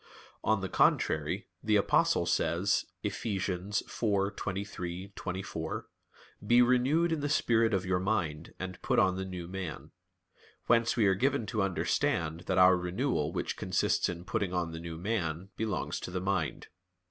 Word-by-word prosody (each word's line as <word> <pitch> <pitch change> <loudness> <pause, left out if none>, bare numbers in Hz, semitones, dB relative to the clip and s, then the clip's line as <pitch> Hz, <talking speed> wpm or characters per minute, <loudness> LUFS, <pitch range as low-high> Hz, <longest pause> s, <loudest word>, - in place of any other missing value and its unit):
On 110 -2 +2
the 95 - -2
contrary, - - +2 0.2
The 110 -1 +2
Apostle 100 - +3
says 85 +5 +1 0.2
(Eph. - - -1
4:23,24): 95 -3 -3 0.6
"Be 120 +1 +6
renewed 130 +8 +3
in 160 - 0
the 145 0 -2
spirit 115 -6 +3
of 95 -3 0
your 90 0 +1
mind, 90 -6 -2
and 95 -1 -6
put - - 0
on 95 -1 +4
the 95 0 -3
new 90 -2 -6
man." 90 -5 -6 0.7
Whence 115 0 +3
we 110 - +4
are 95 - +5
given 130 +4 +1
to 105 +1 -1
understand 85 -3 0
that 95 - +1
our 90 0 +7
renewal 90 - -1
which - - -2
consists - - +1
in 85 0 -6
putting 100 -3 -1
on 85 -2 -1
the 80 - -6
new 85 -1 -6
man, 90 -2 -2
belongs 110 -1 -2
to - - -6
the 90 +1 -2
mind. 95 -4 -2
95 Hz, 150 wpm, -31 LUFS, 90-110 Hz, 0.7 s, our